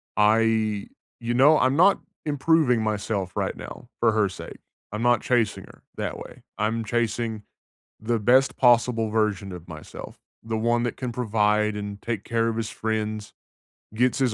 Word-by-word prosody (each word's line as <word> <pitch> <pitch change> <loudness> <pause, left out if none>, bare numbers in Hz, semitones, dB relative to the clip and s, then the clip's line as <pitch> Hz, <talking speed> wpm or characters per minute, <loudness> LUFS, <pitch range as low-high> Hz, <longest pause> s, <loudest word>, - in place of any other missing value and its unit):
I 110 -1 +2 0.3
you 120 +1 -1
know, 145 +5 +6
I'm 130 +1 +2
not 185 +5 +5 0.3
improving 145 -4 +2
myself 105 -3 -2
right - - -1
now 120 - -10
for 115 -2 +4
her 105 -3 +2
sake. 95 - -10 0.3
I'm 105 - -3
not 120 -2 +3
chasing 120 -4 0
her - - -18
that - - -3
way. - - -11
I'm 110 +2 -1
chasing 115 -1 -1 0.6
the 115 +1 0
best 130 +6 +3
possible 120 -2 +3
version 105 -3 0
of 90 -1 -9
myself. 80 -2 -10 0.2
The 110 0 -3
one 120 +1 +1
that 120 -1 -2
can 125 -2 -3
provide 105 -2 +1
and 100 0 -6
take 115 -4 -3
care 115 0 0
of 115 - -2
his 115 -1 -2
friends, 110 -1 -3 0.6
gets 125 +5 +1
his 130 -4 +2
115 Hz, 165 wpm, -25 LUFS, 105-120 Hz, 0.6 s, know